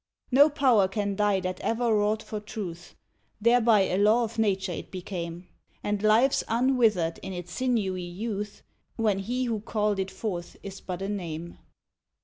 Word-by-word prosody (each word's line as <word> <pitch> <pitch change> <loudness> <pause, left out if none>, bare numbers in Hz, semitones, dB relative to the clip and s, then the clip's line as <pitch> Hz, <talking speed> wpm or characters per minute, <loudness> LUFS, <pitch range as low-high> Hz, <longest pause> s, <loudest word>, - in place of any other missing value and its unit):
No 285 +4 +7
power 255 -9 +4
can 200 +1 -2
die 205 -1 +2
that 185 0 -3
ever 230 0 +1
wrought 210 +1 +1
for 215 - -5
Truth; 185 -5 -7 0.4
Thereby 230 -1 +5
a 190 0 +1
law 215 +4 +4
of 230 0 -4
Nature 195 -3 +1
it - - -6
became, 175 -2 -6 0.4
And 205 -1 -1
lives 220 +5 +4
unwithered 225 -8 +2
in 190 - -6
its 175 -1 -7
sinewy 210 -6 0
youth, 205 +3 -5 0.3
When 215 -4 +1
he 245 +6 -2
who 230 -3 -1
called 210 -1 -1
it 190 0 -1
forth 180 -5 -5
is 195 -1 -8
but 185 0 -5
a - - -2
name. 170 -4 -5
205 Hz, 160 wpm, -27 LUFS, 185-225 Hz, 0.4 s, No